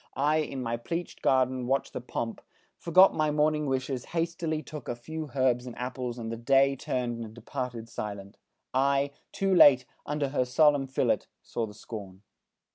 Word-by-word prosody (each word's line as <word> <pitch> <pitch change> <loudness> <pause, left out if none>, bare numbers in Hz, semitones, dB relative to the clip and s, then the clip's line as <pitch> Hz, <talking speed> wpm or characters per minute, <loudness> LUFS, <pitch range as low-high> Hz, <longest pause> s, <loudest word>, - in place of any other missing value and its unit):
I, 150 +3 +2
in 140 -4 -2
my 115 0 -1
pleachéd 165 +9 -5
garden 130 -1 +2
watched 135 +1 0
the - - -4
pomp, 115 -2 -4 0.3
Forgot 185 +3 +5
my 155 -1 +1
morning 150 0 +1
wishes, 130 -1 -2
hastily 165 -2 -2
Took 150 -3 -8
a 120 - -1
few 155 +6 -6
herbs 130 -2 +2
and 120 - -8
apples 125 -1 -4
and 115 -1 -5
the 115 - -4
day 135 +3 +4
Turned 120 -3 -2
and 110 0 -10
departed 120 -1 -5
silent. 100 -3 -6 0.4
I, 140 +1 +2 0.2
too 195 -1 0
late, 135 -7 +7 0.2
Under 150 -1 -1
her 135 -2 +1
solemn 145 +1 +3
fillet, 130 - 0 0.2
saw 115 -2 -3
the 105 - -12
scorn!" 100 -3 -9
130 Hz, 170 wpm, -28 LUFS, 120-150 Hz, 0.4 s, late